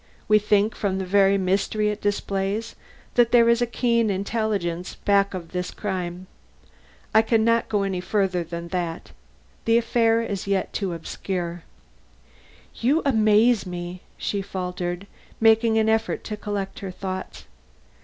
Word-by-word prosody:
We 215 Hz, 0 st, +5 dB
think 210 Hz, +1 st, +2 dB
from 195 Hz, -2 st, -1 dB
the 190 Hz, -, -2 dB
very 195 Hz, +1 st, +4 dB
mystery 200 Hz, +3 st, +1 dB
it 210 Hz, 0 st, -4 dB
displays, 205 Hz, +2 st, -2 dB, 0.4 s
that 240 Hz, -1 st, +4 dB
there 235 Hz, -1 st, +6 dB
is 235 Hz, +1 st, +4 dB
a 240 Hz, -, +2 dB
keen 235 Hz, -2 st, +1 dB
intelligence 195 Hz, -3 st, -2 dB
back 200 Hz, -1 st, +2 dB
of 170 Hz, -3 st, -7 dB
this 180 Hz, 0 st, -3 dB
crime. 185 Hz, -3 st, -4 dB, 0.9 s
I 220 Hz, -, +7 dB
can 225 Hz, 0 st, +2 dB
not 230 Hz, 0 st, +2 dB
go 205 Hz, -2 st, +1 dB
any 190 Hz, -2 st, -2 dB
further 185 Hz, -2 st, 0 dB
than 170 Hz, +1 st, -7 dB
that. 170 Hz, -2 st, -4 dB, 0.5 s
The 230 Hz, 0 st, +4 dB
affair 230 Hz, -1 st, +2 dB
is -, -, -5 dB
as 195 Hz, -1 st, -4 dB
yet 195 Hz, -1 st, 0 dB
too 195 Hz, -4 st, -2 dB
obscure." 175 Hz, +1 st, -4 dB, 1.2 s
"You 280 Hz, +8 st, +2 dB
amaze 220 Hz, -3 st, +4 dB
me!" 175 Hz, 0 st, -6 dB, 0.2 s
she 200 Hz, -, -2 dB
faltered, 180 Hz, -1 st, -4 dB, 0.3 s
making 225 Hz, 0 st, +4 dB
an 220 Hz, 0 st, +3 dB
effort 220 Hz, 0 st, 0 dB
to 215 Hz, -, -4 dB
collect 205 Hz, -2 st, -4 dB
her 195 Hz, -, -5 dB
thoughts. 185 Hz, 0 st, -6 dB
200 Hz, 150 wpm, -24 LUFS, 185-220 Hz, 1.2 s, I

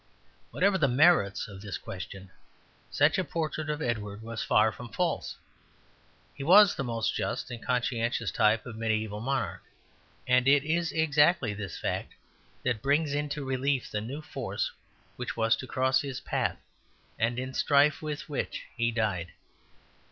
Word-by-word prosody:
Whatever 190 Hz, 0 st, +2 dB
the 145 Hz, -, +4 dB
merits 130 Hz, -, +4 dB
of 100 Hz, -2 st, -10 dB
this 100 Hz, -2 st, -5 dB
question, 95 Hz, 0 st, -8 dB, 0.6 s
such 150 Hz, +6 st, +3 dB
a -, -, +1 dB
portrait 155 Hz, -1 st, -3 dB
of 150 Hz, 0 st, -2 dB
Edward 105 Hz, -3 st, -3 dB
was 115 Hz, -1 st, -5 dB
far 110 Hz, +1 st, +3 dB
from 120 Hz, +2 st, -9 dB
false. 100 Hz, -, -2 dB, 1.0 s
He 135 Hz, -, -7 dB
was 195 Hz, +6 st, +7 dB
the -, -, -3 dB
most 115 Hz, -3 st, -1 dB
just -, -, -3 dB
and 120 Hz, -1 st, -7 dB
conscientious 120 Hz, -4 st, 0 dB
type 105 Hz, +4 st, +2 dB
of 120 Hz, -3 st, -7 dB
mediæval 110 Hz, -2 st, -1 dB
monarch; 135 Hz, +3 st, -2 dB, 0.6 s
and 125 Hz, 0 st, +3 dB
it 140 Hz, 0 st, +5 dB
is 165 Hz, +2 st, 0 dB
exactly 150 Hz, -, +3 dB
this 100 Hz, -1 st, -6 dB
fact -, -, -3 dB, 0.5 s
that 120 Hz, -4 st, 0 dB
brings 145 Hz, +2 st, +1 dB
into 145 Hz, 0 st, -2 dB
relief 130 Hz, 0 st, -1 dB
the 105 Hz, -, -2 dB
new 135 Hz, +8 st, -6 dB
force -, -, -3 dB, 0.5 s
which 125 Hz, -1 st, -5 dB
was 115 Hz, 0 st, +3 dB
to 130 Hz, -, -7 dB
cross 130 Hz, 0 st, +2 dB
his 135 Hz, -3 st, -5 dB
path -, -, -1 dB, 0.6 s
and 115 Hz, +2 st, +1 dB
in 130 Hz, +1 st, -4 dB
strife 145 Hz, +2 st, +3 dB
with 150 Hz, -2 st, -5 dB
which 150 Hz, -, -3 dB
he 120 Hz, 0 st, +1 dB
died. 105 Hz, -7 st, -1 dB
125 Hz, 155 wpm, -29 LUFS, 110-145 Hz, 1.0 s, was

